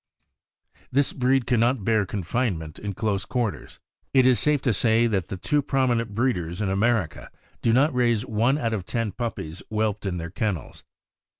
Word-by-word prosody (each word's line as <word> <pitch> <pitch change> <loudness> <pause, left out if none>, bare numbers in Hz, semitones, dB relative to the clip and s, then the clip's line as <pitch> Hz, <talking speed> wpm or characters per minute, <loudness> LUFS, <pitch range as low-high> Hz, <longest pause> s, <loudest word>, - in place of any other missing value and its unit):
This 140 +2 +2
breed 130 0 +2
can 120 -2 +2
not 120 -2 +1
bear 110 -3 +2
confinement 90 -5 -2
in 100 -1 -4
close 100 -1 -1
quarters. 120 -3 -3 0.4
It 130 -1 +6
is 130 -2 +5
safe 150 -1 +3
to 125 - +2
say 115 +3 +3
that 100 -6 0
the 95 - -5
two 145 +10 +1
prominent 120 -6 0
breeders 90 -8 -1
in 105 -3 0
Amer 105 -1 +2
ica - - -12 0.3
do 115 - +2
not 135 +6 +3
raise 120 -3 +1
one 115 +6 +1
out 115 -6 -1
of 100 -5 -2
ten 115 +1 -2
puppies 95 -7 -5
whelped 110 -2 -1
in 90 -2 -2
their 85 -1 -5
kennels. 100 -4 -3
115 Hz, 180 wpm, -25 LUFS, 100-125 Hz, 0.4 s, It